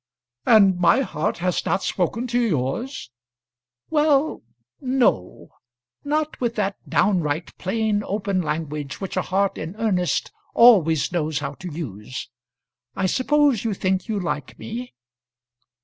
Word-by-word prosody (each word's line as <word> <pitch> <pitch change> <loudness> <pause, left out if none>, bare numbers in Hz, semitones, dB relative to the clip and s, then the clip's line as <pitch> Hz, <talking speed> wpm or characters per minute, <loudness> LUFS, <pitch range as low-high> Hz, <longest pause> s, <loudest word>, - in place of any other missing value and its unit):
"And 195 -5 +6
my 180 +9 +4
heart 150 - -2
has 180 - 0
not 190 - 0
spoken 200 +7 -1
to 245 0 0
yours?" 185 - -2 0.8
"Well; 300 -1 +2 0.4
no; 255 - 0 0.5
not 305 0 -1
with 235 -1 0
that 200 -2 -1
downright 170 -5 +1
plain 210 +1 0
open 200 -2 -1
language 150 -3 -4
which 195 - -5
a - - +2
heart 195 +1 0
in 165 +5 -6
earnest 200 -6 0 0.2
always 180 -12 +5
knows 155 -4 -1
how - - -3
to 180 -2 -8
use. 130 - -6 0.7
I 190 - 0
suppose 275 +2 +2
you 220 -3 -1
think 185 0 -1
you 215 -2 -1
like 150 -6 -4
me?" 240 - -7
195 Hz, 130 wpm, -23 LUFS, 165-235 Hz, 0.8 s, And